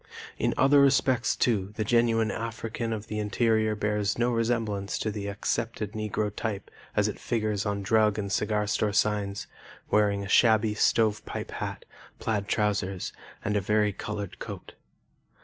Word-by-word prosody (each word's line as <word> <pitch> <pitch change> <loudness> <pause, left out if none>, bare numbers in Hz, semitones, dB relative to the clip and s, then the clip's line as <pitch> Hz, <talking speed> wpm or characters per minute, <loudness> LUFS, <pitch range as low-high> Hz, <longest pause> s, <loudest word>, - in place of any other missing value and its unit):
In - - +1
other 140 +1 +6
respects, 135 -3 +3
too, 105 -4 0
the 110 - -1
genuine 115 0 +2
African 115 0 -4
of 110 -1 -3
the 105 0 -4
interior 110 +1 +1
bears 105 -1 0
no 120 +1 +2
resemblance 115 -4 -1
to 110 - -2
the 100 -1 -5
accepted 105 +1 -2
Negro 105 -1 -2
type 105 -3 -4 0.2
as - - +3
it - - -5
figures 110 -3 -1
on 100 -1 -2
drug 110 +1 +3
and 100 -2 -3
cigar 105 +1 +1
store 105 0 0
signs, 100 -1 0 0.5
wearing 100 -1 +3
a - - -5
shabby 110 +1 +4
stovepipe 105 0 +1
hat, - - -5 0.3
plaid 105 -3 -2
trousers, 100 -2 -1 0.3
and 105 0 0
a 105 - +2
vari 105 +1 +2
colored 105 -1 -5
coat. - - -8
105 Hz, 150 wpm, -27 LUFS, 105-115 Hz, 0.5 s, other